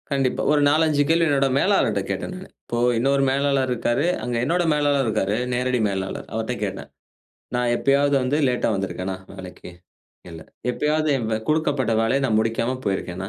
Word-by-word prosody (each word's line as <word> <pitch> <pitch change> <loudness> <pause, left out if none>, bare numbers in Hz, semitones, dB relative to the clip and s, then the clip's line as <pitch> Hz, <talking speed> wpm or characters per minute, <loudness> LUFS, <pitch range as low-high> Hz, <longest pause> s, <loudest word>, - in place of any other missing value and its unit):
கண்டிப்பா. 135 -2 0
ஒரு 150 -1 +3
4,5 155 -1 +2
கேள்வி 165 +1 +3
என்னோட 135 -1 +2
மேலாளர்கிட்ட 115 - +2
கேட்டேன் 100 - -4
நான். 185 +1 -10
இப்போ 120 - -4 0.2
இன்னொரு 135 +3 +2
மேலாளர் 135 -1 +1
இருக்காரு. 120 +4 0 0.2
அங்கே 125 -1 -2
என்னோட 175 +4 +1
மேலாளர் 145 -2 +1
இருக்காரு. 105 -2 0 0.2
நேரடி 125 0 0
மேலாளர். 95 -1 -4
அவர்ட்ட - - -2
கேட்டேன். - - -5 0.7
நான் 125 0 +1
எப்பயாவது 140 +2 +2
வந்து 130 +3 0
லேட்டா 125 -1 0
வந்திருக்கேனா 95 -1 -3 0.2
வேலைக்கு? 95 -2 -10 0.6
இல்ல. 80 -1 -9 0.3
எப்பயாவது 155 +4 0
என் 120 -4 -3 0.2
கொடுக்கப்பட்ட 145 -6 +1
வேலைய 125 +5 +1
நான் 110 -3 +2
முடிக்காம 115 +3 -1
போயிருக்கேனா? 95 -1 -3
130 Hz, 155 wpm, -23 LUFS, 110-145 Hz, 0.7 s, ஒரு